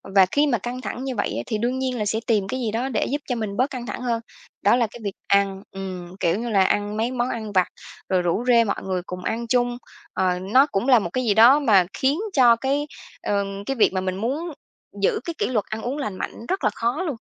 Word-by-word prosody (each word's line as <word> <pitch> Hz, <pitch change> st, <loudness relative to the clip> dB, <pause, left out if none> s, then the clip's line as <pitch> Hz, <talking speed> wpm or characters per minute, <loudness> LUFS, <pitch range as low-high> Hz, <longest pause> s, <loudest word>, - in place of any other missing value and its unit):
Và 190 Hz, -1 st, +8 dB
khi 290 Hz, +1 st, +3 dB
mà 245 Hz, -4 st, +2 dB
căng 245 Hz, +5 st, -5 dB
thẳng 240 Hz, +4 st, -5 dB
như 265 Hz, -1 st, -3 dB
vậy -, -, 0 dB
á, 120 Hz, -, -2 dB
thì 215 Hz, -, -2 dB
đương 245 Hz, +4 st, -1 dB
nhiên 260 Hz, -1 st, -1 dB
là 210 Hz, -, -1 dB
sẽ 220 Hz, +2 st, 0 dB
tìm 210 Hz, -4 st, +2 dB
cái 260 Hz, -, -3 dB
gì 230 Hz, -4 st, -1 dB
đó 240 Hz, +5 st, -1 dB
để 250 Hz, -, 0 dB
giúp 290 Hz, +2 st, -1 dB
cho 250 Hz, -, 0 dB
mình 215 Hz, -3 st, -4 dB
bớt 255 Hz, +3 st, +2 dB
căng 255 Hz, -3 st, -6 dB
thẳng 245 Hz, -, -5 dB
hơn. 235 Hz, -2 st, -1 dB, 0.4 s
Đó 205 Hz, +4 st, +5 dB
là 240 Hz, -2 st, +2 dB
cái 240 Hz, -, -10 dB
việc 200 Hz, -2 st, -3 dB
ăn, 200 Hz, -1 st, +2 dB
ừm, 185 Hz, -2 st, -7 dB
kiểu 170 Hz, +4 st, +1 dB
như 235 Hz, 0 st, -3 dB
là, 195 Hz, -3 st, +4 dB
ăn 205 Hz, +2 st, 0 dB
mấy 230 Hz, +3 st, 0 dB
món 245 Hz, 0 st, -1 dB
ăn 220 Hz, -4 st, -4 dB
vặt, 185 Hz, -2 st, +3 dB, 0.4 s
rồi 185 Hz, -1 st, +2 dB
rủ 175 Hz, +7 st, 0 dB
rê 235 Hz, -2 st, +6 dB
mọi 200 Hz, -, -3 dB
người 185 Hz, -1 st, -2 dB
cùng 180 Hz, 0 st, -7 dB
ăn 230 Hz, +4 st, -2 dB
chung. 245 Hz, 0 st, +1 dB, 0.4 s
Ờ, 180 Hz, -1 st, +1 dB
nó 215 Hz, +9 st, +4 dB
cũng 195 Hz, +7 st, -1 dB
là 250 Hz, -4 st, +7 dB
một -, -, -3 dB
cái 255 Hz, -1 st, 0 dB
gì 220 Hz, -4 st, +2 dB
đó 235 Hz, +7 st, +7 dB
mà 205 Hz, -10 st, +4 dB
khiến 275 Hz, +5 st, +1 dB
cho 245 Hz, -4 st, +6 dB
cái, 275 Hz, +5 st, -1 dB, 0.3 s
ờm, 200 Hz, -1 st, -2 dB
cái 270 Hz, -, -2 dB
việc 220 Hz, -5 st, +3 dB
mà 185 Hz, -, 0 dB
mình 185 Hz, 0 st, -2 dB
muốn 285 Hz, -, -2 dB, 0.5 s
giữ 195 Hz, -, +2 dB
cái 335 Hz, -, -3 dB
kỷ -, -, 0 dB
luật 225 Hz, -5 st, 0 dB
ăn 220 Hz, +1 st, -5 dB
uống 255 Hz, +5 st, -3 dB
lành 210 Hz, -10 st, -4 dB
mạnh 230 Hz, -, -6 dB
rất 380 Hz, -, -1 dB
là -, -, +4 dB
khó 240 Hz, +9 st, -1 dB
luôn. 295 Hz, -, -2 dB
230 Hz, 265 wpm, -23 LUFS, 195-255 Hz, 0.5 s, Và